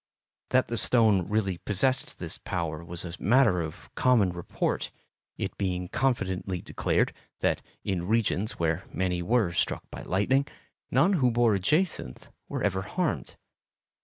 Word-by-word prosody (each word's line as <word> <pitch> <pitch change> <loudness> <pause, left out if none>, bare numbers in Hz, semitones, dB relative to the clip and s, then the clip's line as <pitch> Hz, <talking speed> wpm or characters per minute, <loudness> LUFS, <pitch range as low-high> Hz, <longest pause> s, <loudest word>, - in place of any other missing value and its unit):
That 130 0 +3
the 115 - -2
stone 105 -7 +3
really 100 -5 0
possessed 130 +9 0
this - - -3
power 85 -3 -3
was 85 +1 -4
a 85 - -6
matter 110 -5 +4
of 80 -2 -8
common 115 -8 +3
report, 85 -1 -2 0.5
it - - -3
being 90 -2 -1
confidently 95 -8 0
declared - - 0 0.3
that - - +1 0.2
in 90 -3 -2
regions 110 -1 +1
where 85 +2 0
many 90 -1 -1
were 105 -1 +2
struck - - 0
by - - -7
lightning, 130 +9 +1 0.4
none 195 +4 +4
who 140 -9 +3
wore 120 -2 +3
a 100 - +1
jacinth 150 - -1 0.2
were - - -3
ever 95 - +1
harmed. 160 - -2
100 Hz, 145 wpm, -28 LUFS, 90-120 Hz, 0.5 s, matter